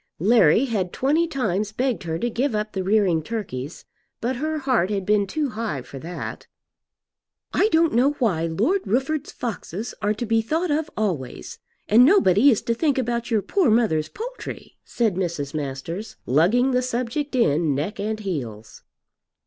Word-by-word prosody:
Larry 215 - +4
had 200 -8 -2
twenty 305 +6 +1
times 210 - -1
begged 250 +1 -1
her 160 -1 -2
to 240 - -1
give 240 +1 -1
up 210 0 -2
the 190 - -2
rearing 190 -4 +2
turkeys, 155 - -6 0.3
but 245 +2 -2
her 310 +3 -2
heart 255 - +1
had 200 -2 -2
been 205 -1 +2
too 295 +6 -1
high 215 - -4
for 135 - -10
that. 170 +5 -7 1.1
"I 425 - +3
don't 325 -2 +3
know 260 +5 +3
why 190 - 0
Lord 230 - +1
Rufford's 275 +6 -1
foxes 225 -2 -5
are 210 +1 +1
to 240 - -3
be 225 0 +2
thought 320 +9 -1
of 310 +1 0
always, 175 - -3 0.3
and 225 +4 +6
nobody 265 - +5
is 225 - +2
to 230 - 0
think 285 +3 +1
about 240 -2 -1
your 220 -4 +1
poor 380 -9 +2
mother's 215 -9 +2
poultry," - - -8
said 220 -6 -1
Mrs. 165 -6 -2
Masters, 155 +8 -5
lugging 195 - +3
the 250 0 +2
subject 255 +3 -2
in 155 - +2
neck 155 +10 -3
and 215 +1 -2
heels. 115 - -5
220 Hz, 165 wpm, -23 LUFS, 175-260 Hz, 1.1 s, and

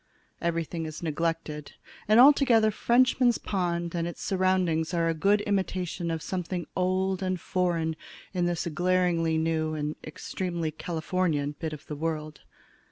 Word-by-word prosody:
Everything 165 -1 -2
is 155 +1 -8
neglected, 160 -2 -2 0.3
and 215 +2 +6
altogether 250 -5 +6
Frenchman's 245 +1 +3
Pond 175 -3 -2
and 170 -1 -1
its 175 - -7
surroundings 185 -3 +1
are 165 -1 +2
a 165 - +2
good 200 +6 +2
imitation 185 -4 -1
of 165 -1 -3
something 180 -1 -3
old 185 +1 0
and 185 -1 -1
foreign 170 -3 0 0.4
in 180 -2 +1
this 175 -1 -1
glaringly 170 -1 +1
new 160 -1 0
and 150 0 -2
extremely 170 +1 -4
Californian 160 -2 -1
bit 160 -2 -3
of 150 -2 -9
the 150 - -6
world. 155 -1 -4
170 Hz, 140 wpm, -28 LUFS, 160-185 Hz, 0.4 s, and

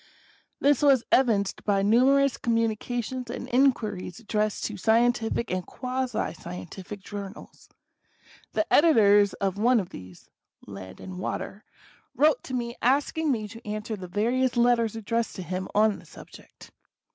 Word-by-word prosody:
This 285 -2 +3
was 275 -5 +5
evinced 220 -7 +2
by 200 -2 +1
numerous 265 +5 +4
communications 235 +2 -2
and 245 +1 -5
inquiries 235 -8 +1
addressed 215 -2 -1
to 215 - -4
scientific 230 +2 +1
and 185 0 -1
quasi 255 0 -3
scientific 175 - -9
journals. 200 0 -9 0.8
The - - +1
editor 215 -10 +6 0.2
of 195 0 -1
one 240 +2 +4
of 185 - -4
these 90 -1 -12 0.4
{Land 95 -2 -10
and 185 -1 -8
Water) 195 +2 -5 0.5
wrote 300 +1 +3
to 255 - -4
me 235 -1 -3
asking 285 +4 +1
me 215 -4 -2
to 230 +2 -12
answer 215 +1 -4
the 185 -3 -8
various 240 +7 0
letters 235 -2 +3
addressed 230 +1 -2
to 185 - -6
him 185 +1 -4
on 215 0 +3
the - - -16
subject. - - -14
225 Hz, 140 wpm, -26 LUFS, 200-250 Hz, 0.8 s, editor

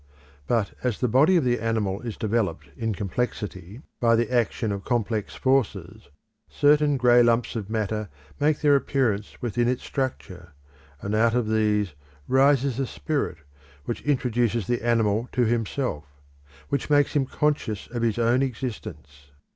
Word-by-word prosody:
But 115 -4 0
as 125 -4 -1
the 125 - +1
body 150 - +4
of 165 - +2
the 120 -2 +1
animal 110 -4 -1
is 115 -4 -6
developed 100 -10 -1
in 110 0 -2
complexity, 105 - -4 0.2
by 115 -1 +4
the 120 +1 0
action 115 -2 0
of 100 -1 -4
complex 115 -3 -1
forces, 110 -7 -1 0.4
certain 145 0 +3
grey 120 -1 +5
lumps 120 0 +2
of 105 -3 -4
matter 110 -1 -2 0.3
make 150 +1 +2
their 145 -2 +5
appearance 120 -7 -1
within 120 0 0
its 125 0 -1
structure, 90 - -5 0.5
and 100 - -3
out 115 +2 +3
of 120 -3 +1
these 105 -4 +1 0.3
rises 135 -1 +3
a 135 - 0
spirit 145 - -2 0.5
which 120 - -4
introduces 120 -6 0
the 120 +4 -1
animal 115 -1 +1
to 125 - +2
himself, 115 - -1 0.6
which 140 0 -2
makes 145 -1 +3
him 140 -3 +1
conscious 145 -10 -1
of 120 -1 -5
his 115 -2 0
own 120 +2 +2
existence. 110 - -6
115 Hz, 150 wpm, -25 LUFS, 105-130 Hz, 0.6 s, grey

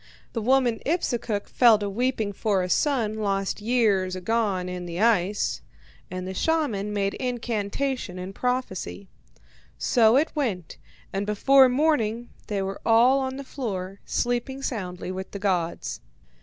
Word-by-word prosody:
The 230 - -2
woman 250 0 +2
Ipsukuk 240 - -1
fell 235 -3 +5
to 205 -1 -3
weeping 220 0 -1
for 200 -2 0
a 180 - -3
son 235 -8 +1
lost 195 -1 -1
long 210 - -9
years 200 -7 +2
agone 195 -1 0
in 180 -1 -5
the 170 +1 -5
ice, 210 -3 +2 0.5
and 185 0 -5
the 190 - -4
shaman 225 - 0
made 200 -1 0
incantation 240 -2 -2
and 185 +1 -6
prophecy. 190 - -3 0.7
So 225 -1 +4
it 305 +3 +2
went, 200 - -2 0.4
and 195 +1 -2
before 265 +5 +5
morning 245 -5 +1 0.2
they 200 -2 -1
were 195 0 -5
all 240 +4 +5
on 265 0 -3
the 275 - -6
floor, 200 -8 -5
sleeping 245 +3 -2
soundly 185 -7 -4
with 190 0 -5
the - - -3
gods. 180 -4 -1
215 Hz, 145 wpm, -25 LUFS, 190-250 Hz, 0.7 s, fell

